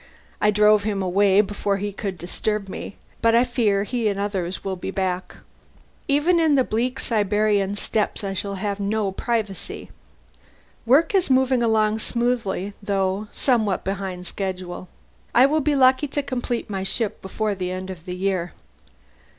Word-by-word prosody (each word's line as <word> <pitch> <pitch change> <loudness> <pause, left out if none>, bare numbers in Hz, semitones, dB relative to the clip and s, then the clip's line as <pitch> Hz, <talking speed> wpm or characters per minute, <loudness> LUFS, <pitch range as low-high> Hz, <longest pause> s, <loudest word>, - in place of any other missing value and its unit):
I 210 - +4
drove 210 0 +5
him 200 -2 -1
away 195 +2 +4
before 200 -1 -1
he 205 +1 -3
could 195 -2 -4
disturb 200 +4 -2
me, 195 - -7 0.3
but 230 0 +4
I 235 - +6
fear 225 -6 +1
he 235 +1 -1
and 200 -1 -1
others 190 -3 -2
will 195 -1 -2
be 180 - -5
back. 185 -2 -2 0.7
Even 295 +5 +3
in 315 -3 +4
the 265 - +4
bleak 245 +3 -1
Siberian 205 -2 +1
steppes 210 +1 -1
I 195 -1 -2
shall 200 +1 -3
have 200 +1 -3
no 200 0 0
privacy. 210 -1 -3 1.0
Work 285 - +4
is 375 -5 +2
moving 260 -1 +3
along 220 -1 +2
smoothly, 235 -5 -1
though 195 0 -1
somewhat 220 -7 +1
behind 190 -2 -4
schedule; 185 -1 -5 0.5
I 250 +2 +8
shall 305 +3 +2
be 295 0 +1
lucky 260 +2 +4
to 285 +1 -2
complete 245 -3 -3
my 195 -2 -3
ship 215 +2 -2
before 210 +2 -2
the 185 -2 -3
end 185 +1 -4
of 170 -2 -10
the 180 -1 -4
year." 185 -2 -1
205 Hz, 160 wpm, -23 LUFS, 195-235 Hz, 1.0 s, I